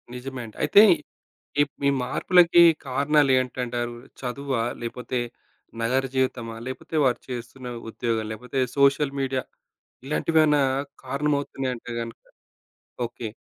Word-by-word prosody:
నిజమే 130 Hz, +1 st, -6 dB
అండి. 110 Hz, -, -13 dB
అయితే 205 Hz, -, +7 dB, 0.8 s
ఇప్ 145 Hz, -1 st, 0 dB
ఈ -, -, +6 dB
మార్పులకి 175 Hz, +6 st, +5 dB, 0.3 s
కారణాలేంటంటారు? 130 Hz, -4 st, +1 dB, 0.3 s
చదువా? 130 Hz, 0 st, -2 dB, 0.2 s
లేపోతే 125 Hz, +1 st, -3 dB, 0.6 s
నగర 130 Hz, +4 st, +1 dB
జీవితమా? 125 Hz, -3 st, -1 dB
లేపోతే 130 Hz, +5 st, -6 dB
వారు 125 Hz, -2 st, +2 dB
చేస్తున్న 125 Hz, +1 st, -7 dB, 0.2 s
ఉద్యోగాలు? 115 Hz, -1 st, -2 dB
లేపోతే 125 Hz, +4 st, -4 dB, 0.2 s
సోషల్ 140 Hz, 0 st, +4 dB
మీడియా? 130 Hz, -1 st, -1 dB, 0.6 s
ఇలాంటివేమన్నా 150 Hz, 0 st, +3 dB, 0.4 s
కారణమవుతున్నాయంటే 135 Hz, -3 st, -2 dB
గనక 115 Hz, 0 st, -6 dB, 0.9 s
ఓకే. 115 Hz, 0 st, -7 dB
130 Hz, 100 wpm, -25 LUFS, 120-140 Hz, 0.9 s, అయితే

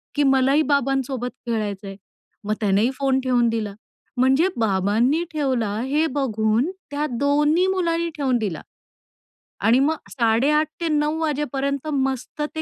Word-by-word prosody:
की, 290 Hz, -, +2 dB
"मलाही 270 Hz, +2 st, +3 dB
बाबांसोबत 270 Hz, -2 st, 0 dB, 0.2 s
खेळायचंय." 205 Hz, -3 st, -3 dB, 0.5 s
मग 210 Hz, -, 0 dB
त्यानेही 210 Hz, +3 st, +2 dB
फोन 265 Hz, 0 st, +1 dB
ठेवून 245 Hz, -2 st, +2 dB
दिला. 215 Hz, -3 st, -2 dB, 0.4 s
म्हणजे 265 Hz, +7 st, +4 dB
बाबांनी 220 Hz, -, +2 dB
ठेवला 260 Hz, -8 st, -1 dB
हे 295 Hz, +5 st, +1 dB
बघून 225 Hz, +1 st, +1 dB, 0.2 s
त्या 295 Hz, +1 st, -1 dB
2न्ही 295 Hz, +5 st, +3 dB
मुलांनी 340 Hz, -3 st, 0 dB
ठेवून 260 Hz, -4 st, +1 dB
दिला 200 Hz, -8 st, -3 dB, 1.1 s
आणि 240 Hz, +3 st, +5 dB
मग 305 Hz, +4 st, +2 dB, 0.2 s
8.30-9.00 300 Hz, +6 st, +1 dB
वाजेपर्यंत 280 Hz, -2 st, -2 dB
मस्त 265 Hz, +2 st, -2 dB
ते 315 Hz, -, -2 dB
270 Hz, 120 wpm, -22 LUFS, 230-295 Hz, 1.1 s, आणि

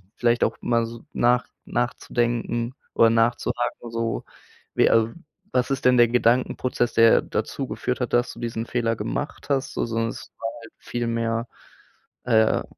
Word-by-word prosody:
vielleicht 120 Hz, 0 st, +2 dB
auch -, -, 0 dB
mal 115 Hz, -1 st, +1 dB
so 115 Hz, 0 st, -10 dB
nach 120 Hz, 0 st, +3 dB, 0.2 s
nachzudenken 120 Hz, 0 st, -1 dB, 0.2 s
oder 115 Hz, 0 st, +5 dB
nachzuhaken 120 Hz, +1 st, 0 dB
so, 115 Hz, 0 st, -2 dB, 0.5 s
wie -, -, +4 dB
al 115 Hz, 0 st, +3 dB, 0.4 s
„Was 125 Hz, +1 st, +1 dB
ist 135 Hz, -1 st, -2 dB
denn 125 Hz, 0 st, +6 dB
der 120 Hz, 0 st, +7 dB
Gedankenprozess, 125 Hz, 0 st, +1 dB
der 115 Hz, 0 st, +6 dB
dazu -, -, -3 dB
geführt -, -, -3 dB
hat, -, -, -2 dB
dass 120 Hz, +1 st, +2 dB
du -, -, -13 dB
diesen 115 Hz, -1 st, -3 dB
Fehler 115 Hz, -2 st, 0 dB
gemacht 130 Hz, +8 st, -4 dB
hast?“ 135 Hz, -2 st, 0 dB
so, -, -, 0 dB
sondern 115 Hz, 0 st, -1 dB
das -, -, -9 dB
war 115 Hz, -, -2 dB
halt 115 Hz, -, -13 dB
viel 120 Hz, -1 st, -3 dB
mehr, 115 Hz, 0 st, -1 dB, 0.8 s
äh, 110 Hz, -3 st, +3 dB
120 Hz, 160 wpm, -24 LUFS, 115-120 Hz, 0.8 s, der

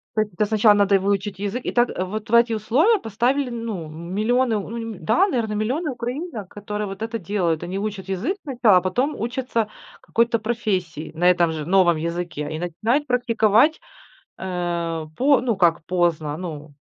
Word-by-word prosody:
То 215 Hz, -, +3 dB
есть 210 Hz, -3 st, -3 dB
это 210 Hz, +4 st, +1 dB
сначала 215 Hz, 0 st, +5 dB
надо 200 Hz, -1 st, +3 dB
и -, -, +7 dB
выучить 195 Hz, 0 st, -1 dB
язык. 205 Hz, +5 st, -3 dB
И -, -, -2 dB
так 240 Hz, 0 st, +3 dB
вот 210 Hz, +4 st, -4 dB
в -, -, -4 dB
эти 235 Hz, 0 st, +5 dB
условия 285 Hz, -, +3 dB
поставили, 250 Hz, +5 st, 0 dB
ну, 225 Hz, -9 st, -5 dB
миллионы, 215 Hz, +8 st, 0 dB
ну 225 Hz, +4 st, -6 dB
не 225 Hz, -3 st, -5 dB
да, 365 Hz, -, +3 dB
наверно, 230 Hz, -, -1 dB
миллионы 260 Hz, +9 st, -1 dB
украинок, 245 Hz, -, -5 dB
которые 210 Hz, 0 st, -5 dB
вот 195 Hz, +2 st, -8 dB
это 230 Hz, 0 st, -3 dB
делают. 170 Hz, -4 st, -1 dB
Они 185 Hz, +3 st, -4 dB
учат 200 Hz, -2 st, -4 dB
язык 240 Hz, -, -1 dB
сначала, 235 Hz, -, +4 dB
потом 245 Hz, +11 st, 0 dB
учатся 235 Hz, -1 st, -1 dB, 0.3 s
какой-то 230 Hz, 0 st, +1 dB
профессии, 195 Hz, -9 st, -2 dB
на 175 Hz, +3 st, +3 dB
этом 175 Hz, -2 st, +3 dB
же, 155 Hz, -2 st, -4 dB
новом 175 Hz, -2 st, +4 dB
языке. 170 Hz, -2 st, -3 dB
И 155 Hz, -, -4 dB
начинают 220 Hz, -, 0 dB
практиковать, 235 Hz, +3 st, +3 dB, 0.6 s
э 170 Hz, -3 st, -3 dB
по 275 Hz, +1 st, +4 dB
ну 235 Hz, -5 st, 0 dB
как 170 Hz, -3 st, +2 dB
поздно, 165 Hz, -4 st, 0 dB
ну, 155 Hz, -4 st, -7 dB
210 Hz, 175 wpm, -22 LUFS, 175-235 Hz, 0.6 s, и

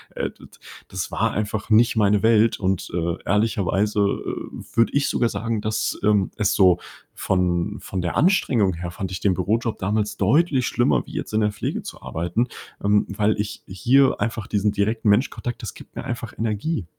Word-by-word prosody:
äh, -, -, -2 dB
d -, -, -16 dB, 0.4 s
das 95 Hz, -1 st, -5 dB
war 115 Hz, 0 st, 0 dB
einfach 105 Hz, +1 st, -3 dB
nicht 115 Hz, +2 st, +4 dB
meine 105 Hz, -1 st, +3 dB
Welt 110 Hz, 0 st, +4 dB
und, 95 Hz, -2 st, -1 dB
äh, 85 Hz, -1 st, -1 dB
ehrlicherweise, 105 Hz, 0 st, +1 dB
äh, 100 Hz, 0 st, -3 dB
würde 115 Hz, 0 st, +3 dB
ich 140 Hz, 0 st, +2 dB
sogar 120 Hz, -, +1 dB
sagen, 115 Hz, -2 st, -2 dB
dass, 110 Hz, 0 st, -1 dB
ähm, 100 Hz, -2 st, +2 dB
es 105 Hz, -3 st, +1 dB
so 90 Hz, -3 st, +5 dB, 0.3 s
von 90 Hz, -2 st, 0 dB
von 95 Hz, -, -4 dB
der 85 Hz, -1 st, -2 dB
Anstrengung 125 Hz, -, +3 dB
her 85 Hz, +1 st, -5 dB
fand 95 Hz, +1 st, -5 dB
ich 90 Hz, -, -4 dB
den 100 Hz, -, +2 dB
Bürojob 110 Hz, +5 st, -1 dB
damals 105 Hz, +2 st, -1 dB
deutlich 135 Hz, -, +3 dB
schlimmer, 75 Hz, -, +1 dB
wie -, -, -12 dB
jetzt -, -, -5 dB
in 110 Hz, -, +2 dB
der 105 Hz, 0 st, +2 dB
Pflege 105 Hz, -, -3 dB
zu -, -, -9 dB
arbeiten, 85 Hz, +9 st, -1 dB, 0.4 s
ähm, 105 Hz, +1 st, +3 dB
weil 105 Hz, +1 st, +1 dB
ich 105 Hz, 0 st, -3 dB
hier 130 Hz, +9 st, +3 dB
einfach 110 Hz, -2 st, -2 dB
diesen 105 Hz, 0 st, +1 dB
direkten 105 Hz, +2 st, 0 dB
Menschkontakt 120 Hz, +2 st, 0 dB
das -, -, -6 dB
gibt -, -, -15 dB
mir -, -, -5 dB
einfach 120 Hz, -1 st, -5 dB
Energie. 110 Hz, -, -2 dB
105 Hz, 185 wpm, -23 LUFS, 95-115 Hz, 0.4 s, so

